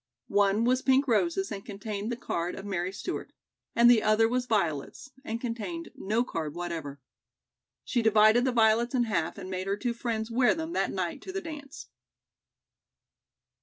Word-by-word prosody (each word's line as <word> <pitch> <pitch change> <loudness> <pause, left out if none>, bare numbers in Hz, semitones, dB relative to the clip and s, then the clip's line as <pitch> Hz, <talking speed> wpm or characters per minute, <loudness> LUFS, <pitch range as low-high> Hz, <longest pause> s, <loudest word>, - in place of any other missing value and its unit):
One 205 +2 +3
was 255 +2 +2
pink 265 +1 +3
roses 340 - +1
and 195 -1 -5
contained 205 +1 -5
the - - -1
card 170 -6 -3
of 195 - -8
Mary 185 -2 -2
Stewart, 350 - -5 0.4
and 235 +1 +6
the 240 -2 +7
other 215 +1 +4
was 245 +1 -1
violets, 195 - -1
and 230 -4 -4
contained 250 +9 -4
no 220 +5 0
card 160 -9 -4
whatever. 165 -5 -5 0.8
She 240 - 0
divided 220 +1 +5
the 260 - +2
violets 235 +2 +3
in 245 - +3
half 170 -8 -1
and 190 -2 -7
made 185 0 -4
her 200 +1 0
two 240 +2 -1
friends 230 -1 -3
wear 245 +1 +3
them 320 +1 -4
that - - +1
night - - -3
to 375 - -7
the 390 - -2
dance. 300 -5 -8
225 Hz, 170 wpm, -28 LUFS, 195-250 Hz, 0.8 s, the